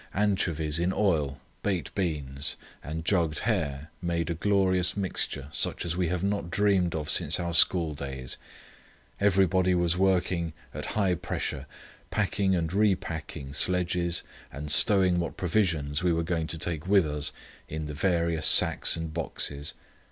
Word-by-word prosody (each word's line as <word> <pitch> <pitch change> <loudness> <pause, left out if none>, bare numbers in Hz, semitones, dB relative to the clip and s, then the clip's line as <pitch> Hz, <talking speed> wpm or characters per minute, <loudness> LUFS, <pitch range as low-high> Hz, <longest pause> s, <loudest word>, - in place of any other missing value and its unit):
Anchovies 85 -6 0
in 90 +2 +1
oil, 80 -9 0 0.2
baked 95 -4 -2
beans, 75 -6 -1 0.3
and 80 +3 -6
jugged 85 -5 +1
hare 80 -9 -2
made 85 -1 -2
a - - 0
glorious 95 0 +1
mixture 90 -7 -3
such - - -2
as 85 -1 -2
we 90 -1 0
have 90 +1 -2
not 100 -3 -1
dreamed 95 -2 +1
of 75 -2 -4
since 85 +5 +2
our 85 -1 -3
school 85 -1 +5
days. 65 -3 -5 0.8
Everybody 95 -2 +3
was 85 -1 +1
working 90 -3 +1 0.2
at - - -6
high 95 -4 +2
pressure, 80 -5 -4 0.4
packing 95 -1 0
and 80 -1 -2
repacking 80 -8 -1
sledges 90 +1 0 0.3
and 75 +2 -5
stowing 95 +1 +5
what 85 - -4
provisions 85 -6 0
we 90 -1 +2
were 85 0 0
going 80 -1 -2
to 80 - -4
take 80 0 -4
with 100 -3 +4
us 75 -1 0 0.4
in 80 0 -4
the 75 - -6
various 85 -1 +1
sacks - - +7
and 80 -1 -5
boxes. 75 -3 -3
85 Hz, 150 wpm, -27 LUFS, 80-95 Hz, 0.8 s, sacks